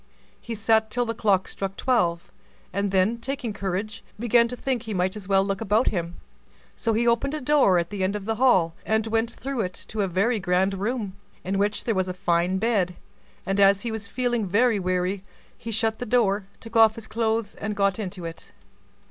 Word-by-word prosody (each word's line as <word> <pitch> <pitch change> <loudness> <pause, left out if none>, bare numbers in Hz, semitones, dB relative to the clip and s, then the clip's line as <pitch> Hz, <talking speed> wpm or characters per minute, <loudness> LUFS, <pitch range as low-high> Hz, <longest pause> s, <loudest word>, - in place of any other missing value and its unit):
He 235 - -5
sat 220 +1 +2
till 245 +2 0
the 230 - -2
clock 200 -4 +1
struck 195 0 -4
twelve, 175 -10 0 0.4
and 200 +1 0
then, 195 +5 +2
taking 255 -3 -4
courage, 200 +2 -4
began 235 +1 +3
to 250 - -5
think 255 -1 -2
he 220 -3 -5
might 185 +2 0
as 205 -3 -8
well 195 -1 +4
look 195 0 -2
about 220 +3 +2
him: 170 -3 -3 0.6
so 230 - 0
he 230 +2 +1
opened 240 +5 +1
a - - -3
door 265 -9 +4
at 170 +1 -1
the 200 -2 -2
end 190 +2 0
of 205 -2 -5
the 220 0 -1
hall, 190 -10 +4
and 220 0 +1
went 225 +1 0
through 265 +1 -4
it 185 -1 -4
into 215 - -3
a 195 - +1
very 200 +6 +1
grand 185 +1 +1
room, 205 0 -2 0.3
in 195 +1 -1
which 205 +1 0
there 230 - 0
was 190 -2 0
a 180 - -4
fine 180 0 +1
bed; 195 -5 +1 0.5
and 195 +2 0
as 200 0 +5
he 235 - -3
was 220 -2 -5
feeling 240 -2 -1
very 225 +3 +3
weary, 185 +1 -1 0.3
he 230 - -8
shut 220 0 0
the 245 - -4
door, 210 -4 +2
took 225 +1 -12
off 220 -1 +6
his 230 - -8
clothes, 220 -1 -1
and 210 -1 -4
got 200 0 +1
into 185 -4 -5
it. 165 0 -8
210 Hz, 210 wpm, -25 LUFS, 190-230 Hz, 0.6 s, off